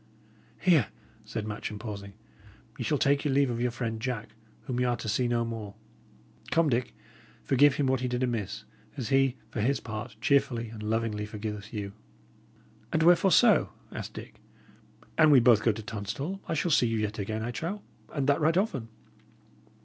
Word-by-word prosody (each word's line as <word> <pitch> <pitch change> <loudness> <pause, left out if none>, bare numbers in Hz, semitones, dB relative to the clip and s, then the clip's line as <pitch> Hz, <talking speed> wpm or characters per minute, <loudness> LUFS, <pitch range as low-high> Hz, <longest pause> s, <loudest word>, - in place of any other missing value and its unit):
"Here," 160 - +4 0.4
said 110 -2 -4
Matcham, 105 0 -5
pausing, 100 -2 -7 0.6
"ye 130 - -4
shall 150 +5 +1
take 140 +1 +2
your 140 -3 +1
leave 140 -2 +3
of 120 0 -3
your 125 - +2
friend 115 -1 -4
Jack, 120 -3 -3 0.3
whom 125 -3 -3
y' - - +2
are 120 -1 +1
to - - -6
see 115 +4 +1
no 120 -1 +1
more. 110 -3 -6 0.7
Come, 165 -2 +3
Dick, 120 -1 -1 0.5
forgive 140 +1 +4
him 145 - +1
what 130 -1 +2
he 130 - -1
did 125 +1 -1
amiss, 115 -6 -2 0.3
as 120 -6 -3
he, 135 -1 +3
for 110 - -2
his 135 +5 +1
part, 110 0 -6
cheerfully 135 -4 +2
and 110 -1 -9
lovingly 105 -1 -1
forgiveth 105 0 -6
you." 100 -3 -5 1.0
"And 160 - +2
wherefore 175 +3 +6
so?" 235 +2 +5 0.2
asked - - -7
Dick. - - -10 0.8
"An 155 -1 +7
we 140 -3 +8
both 115 -3 +5
go 115 - +3
to 110 +1 -6
Tunstall, 115 - -4
I 165 - -1
shall 170 +2 0
see 125 -5 +4
you 115 0 0
yet 105 0 -2
again, 110 +2 -3
I 120 - -2
trow, 170 - -4 0.3
and 140 -3 -1
that 140 +2 +2
right 160 +3 +3
often." 140 - 0
120 Hz, 185 wpm, -29 LUFS, 110-140 Hz, 1.0 s, we